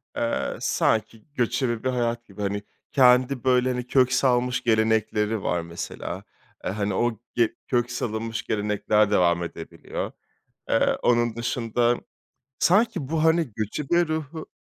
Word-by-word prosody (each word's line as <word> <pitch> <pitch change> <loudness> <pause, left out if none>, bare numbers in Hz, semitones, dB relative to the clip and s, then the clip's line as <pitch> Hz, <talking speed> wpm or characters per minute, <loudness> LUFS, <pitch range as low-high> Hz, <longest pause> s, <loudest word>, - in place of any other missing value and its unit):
Eee, 115 - -1
sanki 110 0 0
göçebe 120 -2 0
bir 130 - +1
hayat 120 -2 -1
gibi 105 -1 -10
hani 100 0 -2 0.3
kendi 125 0 +4
böyle 130 -1 +3
hani 125 0 -4
kök 130 -1 +3
salmış 125 -1 +2
gelenekleri 110 -1 +1
var 85 - 0
mesela, 85 +1 -6 0.4
eee, - - -2
hani, 100 -1 -2
o 115 +2 0 0.2
ge 120 -2 +2
kök 120 -1 0
salınmış 115 -2 -3
gelenekler 105 0 +1
devam 85 -3 +3
edebiliyor. 85 -1 -6 0.6
Eee, - - +2
onun 120 -1 +2
dışında 120 0 0 0.6
sanki 190 - +2
bu 160 -1 0
hani 160 -5 +3
göçebe 150 - 0
ruhu 155 0 -4
120 Hz, 130 wpm, -25 LUFS, 110-130 Hz, 0.6 s, kendi